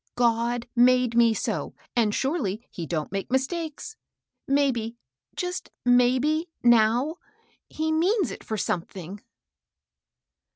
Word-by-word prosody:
God 235 0 +1
made 250 -1 +4
me 235 -1 +5
so, - - -3 0.2
and 225 -3 +3
surely 240 - -1
he 165 -2 -6
don't 155 -2 -3
make 195 0 -3
mistakes. 315 +9 -2 0.5
Maybe 255 -5 +1 0.2
— 130 - -44
just 360 0 -4 0.2
maybe^ 255 +7 +3 0.2
now, 240 +6 +4 0.5
he 315 0 -2
means 365 +5 +2
it - - -9
for 220 - -3
something." 185 +1 -4
245 Hz, 115 wpm, -26 LUFS, 225-300 Hz, 0.5 s, me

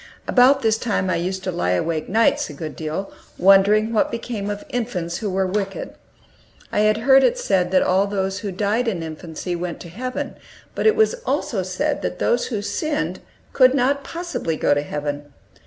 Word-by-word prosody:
About 265 +2 +5
this 220 0 +2
time 195 -5 0
I - - +1
used 185 +2 -3
to 185 - -2
lie 90 - 0
awake 155 - -1
nights 225 +3 +2
a - - -8
good 155 +1 -6
deal, 160 +5 -4 0.2
wondering 200 +4 +5
what 215 - +2
became 230 -3 -4
of 205 0 -4
infants 190 -9 -3
who 215 - -3
were 190 0 0
wicked. 195 +1 -3 0.8
I - - 0
had 215 0 +3
heard 270 0 +7
it 480 - +3
said 190 - +1
that 185 0 +3
all 190 +2 +2
who 195 +1 -2
died 210 +6 0
in 185 -7 -1
infancy 160 +2 -5
went 175 -1 -4
to 170 - -9
heaven, 255 +8 -5 0.4
but - - +1
it 440 - +5
was 440 +1 +3
also 215 - -1
said 285 +11 -2
that - - -3
those 240 - +1
who 210 -5 -3
sinned 305 +7 -2 0.3
could 255 0 +5
not 280 +2 +1
possibly 335 - -4
go 145 - +3
to 145 - +1
heaven. 145 0 -5
200 Hz, 190 wpm, -22 LUFS, 175-245 Hz, 0.8 s, heard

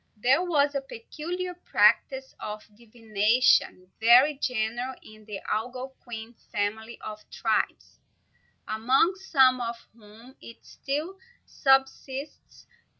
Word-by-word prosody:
There 255 +9 +3
was 295 -5 +2
a 275 - -1
peculiar 340 +9 -6
practice 270 -6 +2
of 210 0 -6
divination 220 -3 +1
very 245 +6 +6
general 245 -1 -2
in 215 0 -15
the 205 -2 -7
Algonquin 240 0 -5 0.2
family 220 +3 -3
of 215 0 -7
tribes, - - -2 0.7
among 255 - +2
some 265 -9 +3
of 235 0 -3 0.2
whom 225 +4 -17
it 230 - -13
still 310 +8 -4 0.3
subsists. 270 +1 -1
250 Hz, 100 wpm, -27 LUFS, 220-275 Hz, 0.7 s, very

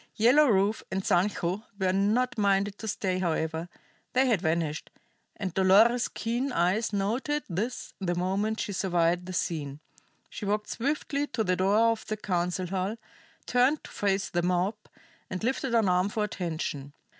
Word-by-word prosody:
Yellow 255 +7 +5
Rufe 205 -1 +2
and 190 0 -2
Sancho 180 +1 +1 0.2
were 190 -2 +1
not 215 +6 +1
minded 200 -1 +1
to 220 - -6
stay, 190 -3 -1
however; 160 -1 -1 0.4
they 260 +1 +4
had 225 -8 +2
vanished; 160 -2 -1 0.5
and 190 -4 -4
Dolores's 210 +6 +5
keen 240 +4 -2
eyes 205 +3 +1
noted 235 +9 -1
this 210 +8 -4
the 175 -3 -1
moment 195 +5 -1
she 205 - -3
surveyed 175 -1 +1
the 185 - -5
scene. 150 -5 -2 0.5
She - - -9
walked 210 +1 -1
swiftly 285 +2 -1
to 255 -5 -1
the 185 -2 +1
door 205 +5 +3
of 225 - -5
the 215 - -2
council 180 -2 -1
hall, 190 +4 -2 0.5
turned 255 +5 +2
to - - -11
face 195 -1 -1
the 175 - +1
mob, 180 +3 +1 0.6
and 185 +2 -5
lifted 260 0 0
an 225 -3 +3
arm 180 +2 +2
for 215 +1 -1
attention. 160 -7 -4
195 Hz, 160 wpm, -28 LUFS, 180-225 Hz, 0.6 s, Yellow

